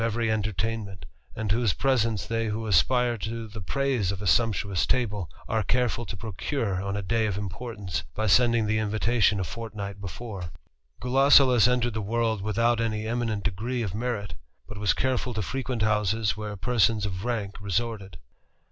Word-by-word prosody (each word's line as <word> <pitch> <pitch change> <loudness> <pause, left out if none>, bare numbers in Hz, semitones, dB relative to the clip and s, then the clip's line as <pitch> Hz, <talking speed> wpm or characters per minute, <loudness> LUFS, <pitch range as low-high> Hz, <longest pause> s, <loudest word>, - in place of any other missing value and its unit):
rery 115 0 0
entertainment, 110 -1 -2 0.3
and 110 -2 -2
whose 115 -2 +2
presence 115 -7 +1
they 115 0 -1
who 110 +1 -3
aspire 120 +5 +3
to 115 +1 -4
le 110 - -6
praise 125 -2 0
of 100 - -4
a 105 - -5
sumptuous 100 -1 +2
table 105 - 0 0.2
are 110 0 +1
careful 120 +1 0
to 100 - -5
procure 110 -1 -2
on 100 +1 -2
a 100 - -3
ay 115 -1 +2
of 100 -2 -2
importance, 100 -1 -4
by 110 - -1
sending 115 +2 +4
the 110 +1 +1
invitation 110 0 +2
a - - 0
fortnight 105 -1 -6
efore. 100 -2 -6 0.5
Gulosulus 130 -2 +6
entered 120 -1 +1
the 110 - -2
world 110 0 0
without 115 +3 +1
any 110 -1 -1
eminent 115 -3 -1
degree 115 +5 -2
f 95 -4 -3
merit; 110 -2 -3 0.3
but 105 - -8
was 105 -1 +2
careful 125 -2 -1
to 110 - -1
frequent 130 -1 -2
houses 110 0 +1
where 105 -1 -5
persons 115 -1 +2
f 95 -1 -4
rank 110 -5 -3
resorted. 100 -3 -2
110 Hz, 165 wpm, -27 LUFS, 100-120 Hz, 0.5 s, Gulosulus